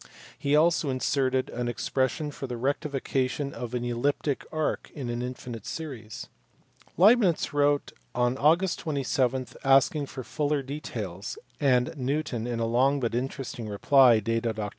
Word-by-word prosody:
He 140 Hz, +1 st, +2 dB
also 160 Hz, -1 st, +3 dB
inserted 130 Hz, 0 st, 0 dB
an 120 Hz, 0 st, -3 dB
expression 130 Hz, +4 st, -1 dB
for 135 Hz, -, -6 dB
the 125 Hz, -1 st, -4 dB
rectification 140 Hz, 0 st, -1 dB
of 125 Hz, 0 st, -5 dB
an 120 Hz, 0 st, -2 dB
elliptic 135 Hz, +4 st, -1 dB
arc 155 Hz, -1 st, -2 dB
in 130 Hz, -5 st, -4 dB
an 120 Hz, 0 st, -3 dB
infinite 125 Hz, -3 st, -6 dB
series. 125 Hz, -9 st, -6 dB, 0.7 s
Leibnitz 195 Hz, -5 st, +4 dB
wrote 145 Hz, 0 st, +2 dB, 0.3 s
oil 120 Hz, 0 st, +3 dB
Aug. 165 Hz, +7 st, +3 dB
27 135 Hz, -4 st, 0 dB, 0.2 s
asking 135 Hz, +2 st, +4 dB
for 130 Hz, -, -7 dB
fuller 150 Hz, +1 st, -1 dB
details; 145 Hz, -, -5 dB, 0.2 s
and 125 Hz, -1 st, +2 dB
Newton 130 Hz, -3 st, -2 dB
in 120 Hz, -1 st, -2 dB
a 115 Hz, -, +1 dB
long 130 Hz, +5 st, +2 dB
but 120 Hz, -3 st, -1 dB
interesting 125 Hz, -2 st, -4 dB
reply, 120 Hz, +3 st, +5 dB
dated 115 Hz, +1 st, -1 dB
Oct. 105 Hz, -1 st, -3 dB
135 Hz, 140 wpm, -27 LUFS, 120-145 Hz, 0.7 s, reply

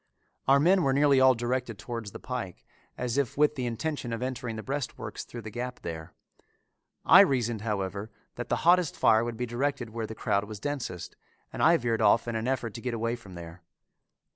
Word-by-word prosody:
Our 135 Hz, +1 st, +6 dB
men 180 Hz, +6 st, +4 dB
were 135 Hz, -5 st, +2 dB
nearly 140 Hz, -1 st, +4 dB
all 130 Hz, -1 st, +6 dB
directed 120 Hz, -1 st, -2 dB
towards 115 Hz, -1 st, -6 dB
the -, -, -10 dB
pike 95 Hz, -, -6 dB, 0.3 s
as 125 Hz, +2 st, -1 dB
if 140 Hz, -2 st, -2 dB
with 150 Hz, 0 st, +4 dB
the 130 Hz, -4 st, -3 dB
intention 125 Hz, +1 st, -3 dB
of 115 Hz, +2 st, -3 dB
entering 125 Hz, -3 st, -4 dB
the 110 Hz, -, -6 dB
breastworks 140 Hz, -2 st, -4 dB
through 120 Hz, -2 st, -9 dB
the 110 Hz, -, -7 dB
gap 125 Hz, +3 st, -5 dB
there. 80 Hz, -2 st, -7 dB, 0.9 s
I -, -, +9 dB
reasoned, 120 Hz, -5 st, +3 dB
however, 100 Hz, -1 st, -3 dB, 0.2 s
that 120 Hz, -1 st, -6 dB
the -, -, -1 dB
hottest 175 Hz, -2 st, +4 dB
fire 110 Hz, +1 st, +4 dB
would 120 Hz, -1 st, -4 dB
be 125 Hz, -, -1 dB
directed 125 Hz, 0 st, -2 dB
where 115 Hz, -1 st, -4 dB
the 110 Hz, -, -7 dB
crowd 100 Hz, -1 st, 0 dB
was 105 Hz, -1 st, -8 dB
densest, 95 Hz, -11 st, -4 dB, 0.4 s
and -, -, -4 dB
I 170 Hz, +1 st, +6 dB
veered 115 Hz, -4 st, -1 dB
off 110 Hz, +2 st, +4 dB
in 115 Hz, -, -2 dB
an 110 Hz, +2 st, -2 dB
effort 125 Hz, -4 st, -1 dB
to 115 Hz, -, -7 dB
get 125 Hz, -1 st, -2 dB
away 115 Hz, +1 st, -1 dB
from 100 Hz, -6 st, -13 dB
there. 85 Hz, +1 st, -10 dB
120 Hz, 205 wpm, -28 LUFS, 110-130 Hz, 0.9 s, I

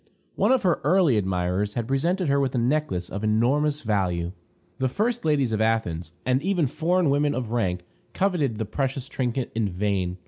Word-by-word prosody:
One -, -, +2 dB
of 260 Hz, -3 st, +3 dB
her 180 Hz, -3 st, +2 dB
early 165 Hz, -3 st, +4 dB
admirers 95 Hz, +1 st, -1 dB
had 115 Hz, -2 st, -2 dB
presented 170 Hz, +7 st, 0 dB
her 140 Hz, 0 st, +3 dB
with 135 Hz, -2 st, 0 dB
a -, -, +1 dB
necklace 120 Hz, -8 st, 0 dB
of 100 Hz, +2 st, -6 dB
enormous 140 Hz, +8 st, +2 dB
value. 90 Hz, -, 0 dB, 0.5 s
The 130 Hz, 0 st, +1 dB
first 225 Hz, -, -1 dB
ladies 140 Hz, -6 st, +2 dB
of 110 Hz, -1 st, 0 dB
Athens, 90 Hz, -7 st, 0 dB
and 130 Hz, +1 st, +2 dB
even 180 Hz, -2 st, +1 dB
foreign 165 Hz, +3 st, +1 dB
women 145 Hz, +1 st, +2 dB
of 120 Hz, -3 st, -3 dB
rank, 90 Hz, -7 st, -1 dB, 0.3 s
coveted 170 Hz, -, 0 dB
the 110 Hz, -, -2 dB
precious 135 Hz, +4 st, -2 dB
trinket 125 Hz, -1 st, -2 dB
in 110 Hz, -3 st, 0 dB
vain. 95 Hz, -1 st, -1 dB
125 Hz, 180 wpm, -25 LUFS, 105-150 Hz, 0.5 s, early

